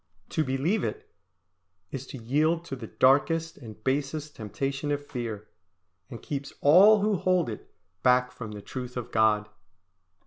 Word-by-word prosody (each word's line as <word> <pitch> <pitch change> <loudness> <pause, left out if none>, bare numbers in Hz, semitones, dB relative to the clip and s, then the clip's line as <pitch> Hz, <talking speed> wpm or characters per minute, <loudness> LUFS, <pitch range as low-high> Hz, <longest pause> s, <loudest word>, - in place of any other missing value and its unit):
To 160 - 0
believe 150 +10 0
it 105 - -4 0.8
is 135 0 -6
to - - -8
yield 155 +8 +1
to 135 - -5
the 120 -4 -8
darkest 160 +7 +2
and 110 -4 -11
basest 145 +3 -2
temptation 135 +7 -3
of 145 0 -2
fear, 115 -6 -5 0.6
and 115 - -8
keeps 140 -1 -5
all 200 +8 +7
who 210 -1 +2
hold 180 -7 +1
it 105 - -10 0.3
back 125 +1 +3
from 110 -3 -8
the 105 -1 -8
truth 125 -1 -6
of 120 - -5
God. 110 -1 +3
135 Hz, 150 wpm, -27 LUFS, 115-155 Hz, 0.8 s, all